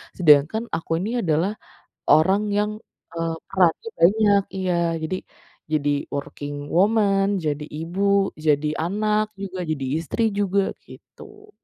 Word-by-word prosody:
sedangkan 155 +5 +4
aku 165 0 -2
ini 220 +8 -1
adalah 170 0 +1 0.6
orang 195 +7 +4
yang, 210 +1 +1 0.4
eee, 165 -1 -2
perannya 190 - +1
banyak. 200 +2 +4
Iya, 185 -1 0 0.3
jadi 185 +4 -2 0.5
jadi 145 -2 +1 0.2
working 145 0 -5
woman, 200 0 +3
jadi 150 -3 -2
ibu, 195 +6 0
jadi 150 0 +3 0.2
anak 210 +3 0
juga, 190 -2 -6
jadi 140 -3 -2 0.2
istri 225 - -2
juga 200 -1 0
gitu. 420 0 -15
190 Hz, 120 wpm, -23 LUFS, 160-205 Hz, 0.6 s, sedangkan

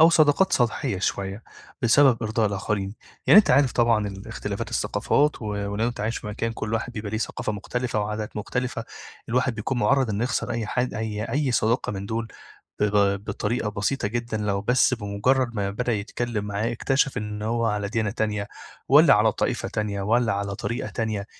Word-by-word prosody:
أو 160 +1 +8
صداقات 155 +3 +4
سطحية 115 -5 +1
شوية 100 +2 -2 0.4
بسبب 120 0 +5
إرضاء 110 0 +1
الآخرين، 100 0 -2 0.3
يعني 210 - +9
أنت 210 - +5
عارف 135 -3 +4
طبعًا 115 -3 +2
ال 95 0 -9
إختلافات - - -4
الثقافات 145 -3 +1
و - - -5
ولو 100 +2 -1
أنت 120 - -6
عايش 110 +3 -1
في - - -10
مكان 110 +2 -2
كل 110 0 -3
واحد 115 +2 -2
بيبقى 105 -3 -5
ليه 110 - -2
ثقافة 115 0 -3
مختلفة 115 +2 -2
وعادات 105 +1 -4
مختلفة 120 +2 -3 0.4
الواحد 125 +1 +1
بيكون 110 +4 -2
مُعرّض 130 +2 +2
إن 100 0 -2
يخسر 120 -1 -1
أي 115 -2 -2
حد 125 +3 -1
أي 110 -1 -3
أي 140 0 0
صداقة 115 +1 +1
من 100 0 -5
دُول 110 +1 -3 0.5
ب - - +4
ب 100 -1 +2
بطريقة 110 +1 -2
بسيطة 105 +3 -1
جدًا 120 0 -3
لو 105 -2 -1
بس 125 +4 +3
بمُجرّد 115 +4 0
ما 100 -2 -1
بدأ 120 +4 -1
يتكلّم 110 +1 -2
معاه 105 +3 -2
اكتشف 135 +3 +1
إن 105 0 -5
هو 115 +2 0
على 105 -2 -1
ديانة 110 -2 -1
تانية 105 -2 -2 0.4
والّا - - +7
على - - +4
طائفة - - -1
تانية 100 -2 -2
والّا 115 +1 +2
على 100 0 -2
طريقة 120 +5 -3
تانية، 110 -3 -2
110 Hz, 185 wpm, -25 LUFS, 105-120 Hz, 0.5 s, يعني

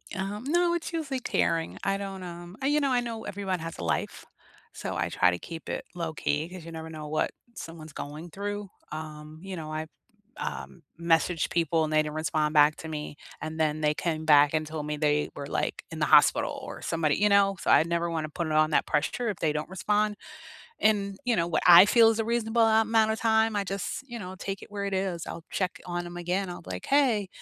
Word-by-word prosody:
Um, 200 +4 -4
no 345 +3 +3
it's 345 0 -3
usually 300 -6 -2
tearing. 165 -8 0
I 195 0 +1
don't, 195 -1 -6
um, 175 +1 -9
I 270 - 0
you 295 +1 +3
know, 275 -2 +1
I 250 - +3
know 230 -2 -4
everyone 190 -2 -3
has 165 0 -6
a - - -6
life, 85 - -2 0.5
so - - -5
I - - -1
try 90 - +3
to 90 - -3
keep 165 -1 -8
it - - -3
low 165 -2 -3
key 150 +2 -1
'cause 180 -2 -10
you 165 - -8
never 160 0 -7
know 155 -1 -7
what 155 +1 0 0.2
someone's 160 -2 -9
going 150 +5 -7
through. 205 +2 -5 0.2
Um, 155 0 -8
you 190 0 -6
know, 155 -2 -6
I've, 155 0 -4 0.5
um, 170 - -6 0.2
messaged 170 0 +2
people 165 -1 +1
and 155 - -3
they 155 - +5
didn't 150 0 -5
respond 155 -1 0
back 150 0 +6
to 160 - -8
me, 150 -1 -5 0.3
and 155 +1 -5
then 155 -1 +1
they 150 0 +3
came 160 0 -2
back 145 -1 +6
and 155 -1 0
told 155 -1 -5
me 150 0 -3
they 150 0 +1
were, 140 - -5
like, - - -2
in - - -6
the - - +2
hospital - - +4
or - - -8
somebody 160 -3 +1
you 210 +2 +3
know, 200 -1 +4
so - - +1
I - - +7
never 170 +1 -1
wanna 160 -2 -2
put 165 +2 -3
it 155 - -2
on 155 0 +3
that - - +3
pressure 230 +10 0
if 200 - -3
they 155 -2 0
don't 150 +2 -3
respond. 210 +2 0 0.6
And, 200 -2 +2
you 245 -2 +2
know, 170 - +1
what 170 - 0
I 175 +2 +10
feel 230 +1 +6
is 225 - -1
a 225 - +1
reasonable 230 0 +1
a 220 0 +5
amount 220 0 +3
of 220 - -4
time, 220 -1 +3
I 205 - +1
just, 195 +5 -4
you 240 -1 -6
know, 185 -3 -7
take 195 +1 -5
it - - -12
where 200 -1 -4
it 200 -1 -2
is, 190 -3 -2
I'll 165 - -7
check 185 -2 -2
on 175 0 -3
'em 175 0 -8
again, 180 +2 -1
I'll 175 - -7
be 95 - -11
like, 90 0 -5
"Hey, 250 -9 +3
175 Hz, 240 wpm, -28 LUFS, 155-205 Hz, 0.6 s, I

